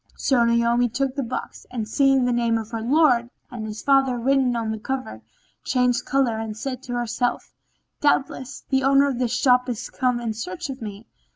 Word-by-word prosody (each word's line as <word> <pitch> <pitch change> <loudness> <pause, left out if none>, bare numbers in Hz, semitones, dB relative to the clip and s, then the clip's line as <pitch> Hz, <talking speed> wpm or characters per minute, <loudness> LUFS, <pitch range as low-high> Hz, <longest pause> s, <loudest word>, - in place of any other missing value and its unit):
So 255 -4 +2
Naomi 235 +1 +2
took 265 +3 -2
the 280 - -1
box 250 0 -6
and, 230 -4 -4
seeing 270 +2 +3
the 245 - +1
names 235 -1 +1
of 220 -1 -7
her 225 -1 -3
lord 245 -2 +3 0.2
and 225 -3 -5
his 215 0 -7
father 270 -2 +3
written 260 0 +2
on 225 -2 -2
the 220 - -4
cover, 255 - -4 0.4
changed 250 -1 +1
colour 260 -5 +1
and 220 -1 -5
said 255 +1 -4
to 245 - -5
herself, 240 0 -2 0.5
"Doubtless, 275 -2 0
the 265 0 +3
owner 275 +1 +5
of 260 -3 -2
this 245 -1 0
shop 250 -1 +3
is 235 -3 -5
come 250 -2 0
in 230 -2 -3
search 350 +7 -5
of 260 - -9
me." 210 0 -7
245 Hz, 195 wpm, -23 LUFS, 230-270 Hz, 0.5 s, owner